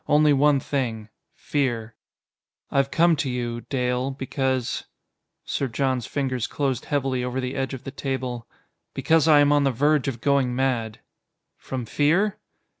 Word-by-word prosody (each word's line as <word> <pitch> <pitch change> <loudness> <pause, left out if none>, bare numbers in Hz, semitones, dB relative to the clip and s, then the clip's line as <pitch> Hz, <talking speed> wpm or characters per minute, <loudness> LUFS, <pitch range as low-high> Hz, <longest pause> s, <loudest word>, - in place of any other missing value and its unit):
Only 150 0 +5
one 145 0 +4
thing 115 -6 -3 0.3
fear. 120 -6 -2 0.8
"I've 135 0 +2
come 170 +3 +4
to 140 -1 -1
you. 120 -1 -3
Dale, 125 0 0
because 130 -2 -2 0.3
" - - -56 0.3
Sir 140 - -1
John's 130 0 -1
fingers 130 -4 -2
closed 135 -4 -2
heavily 135 -3 -1
over 125 +1 -2
the 130 0 -3
edge 135 0 -2
of 130 - -11
the 135 - -6
table 130 -4 -4 0.5
"because 160 -1 +3
I 150 -2 +7
am 145 0 +4
on 145 -1 +4
the 135 - +3
verge 145 +3 +2
of 125 -4 -3
going 135 -2 +1
mad." 120 -4 -1 0.5
"From 130 -3 -5
fear?" 170 - +1
135 Hz, 155 wpm, -24 LUFS, 125-145 Hz, 0.8 s, I